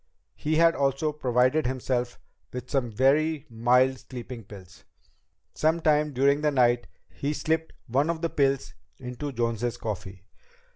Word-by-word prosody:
He 155 Hz, +1 st, -1 dB
had 165 Hz, +1 st, +5 dB
also 140 Hz, +2 st, 0 dB
provided 130 Hz, +1 st, +2 dB
himself 125 Hz, -1 st, -2 dB, 0.3 s
with 125 Hz, 0 st, -7 dB
some 135 Hz, -4 st, 0 dB
very 145 Hz, +6 st, +2 dB
mild 125 Hz, +3 st, +3 dB
sleeping 125 Hz, -2 st, -8 dB
pills. 100 Hz, -2 st, -13 dB, 0.7 s
Sometime 155 Hz, -1 st, +2 dB
during 140 Hz, +2 st, +2 dB
the 150 Hz, -, +3 dB
night 120 Hz, -3 st, +2 dB, 0.2 s
he 145 Hz, +2 st, -3 dB
slipped 160 Hz, +1 st, -1 dB
one 135 Hz, +6 st, +1 dB
of 170 Hz, 0 st, -2 dB
the 165 Hz, -, +1 dB
pills 135 Hz, -1 st, +1 dB, 0.2 s
into 125 Hz, +3 st, -6 dB
Jones's 115 Hz, -1 st, -1 dB
coffee. 100 Hz, -3 st, -6 dB
130 Hz, 135 wpm, -27 LUFS, 120-150 Hz, 0.7 s, had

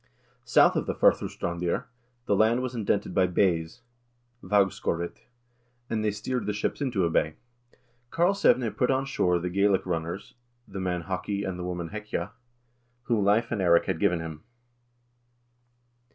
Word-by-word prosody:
1 -, -, -37 dB, 0.4 s
South -, -, +5 dB
of -, -, -1 dB
the -, -, -1 dB
Fur'Sustrandir 85 Hz, +5 st, +1 dB, 0.2 s
" 120 Hz, 0 st, -43 dB
the 100 Hz, -, +2 dB
land 115 Hz, +5 st, +3 dB
was 130 Hz, -1 st, -3 dB
indented 105 Hz, -3 st, -1 dB
by 95 Hz, -, +3 dB
bays 90 Hz, +1 st, 0 dB, 0.6 s
(vag 100 Hz, 0 st, +3 dB
skorit) 85 Hz, +1 st, -4 dB, 0.6 s
and 110 Hz, -1 st, 0 dB
they 105 Hz, -, +2 dB
steered 110 Hz, +5 st, -3 dB
the 105 Hz, -, 0 dB
ships 105 Hz, -, -2 dB
into 120 Hz, -10 st, +1 dB
a -, -, +1 dB
bay." 80 Hz, -1 st, +1 dB, 0.8 s
Karlsevne 170 Hz, -, +3 dB
put 125 Hz, -, +1 dB
on 135 Hz, 0 st, +1 dB
shore 90 Hz, -10 st, +1 dB
the 90 Hz, +1 st, -3 dB
Gaelic 100 Hz, 0 st, +2 dB
runners 85 Hz, +2 st, -4 dB, 0.3 s
(the 95 Hz, -, -7 dB
man 90 Hz, -2 st, -2 dB
Haki 100 Hz, +2 st, -3 dB
and 90 Hz, -1 st, -4 dB
the -, -, -4 dB
woman 90 Hz, -2 st, -4 dB
Hekja) 105 Hz, -3 st, -4 dB, 0.7 s
whom 115 Hz, -4 st, +1 dB
Leiv 105 Hz, +4 st, +2 dB
and 110 Hz, -4 st, -1 dB
Eirik 85 Hz, -2 st, +4 dB
had 95 Hz, -4 st, -2 dB
given 90 Hz, -5 st, +2 dB
him. 80 Hz, -2 st, -7 dB
100 Hz, 160 wpm, -27 LUFS, 90-110 Hz, 0.8 s, South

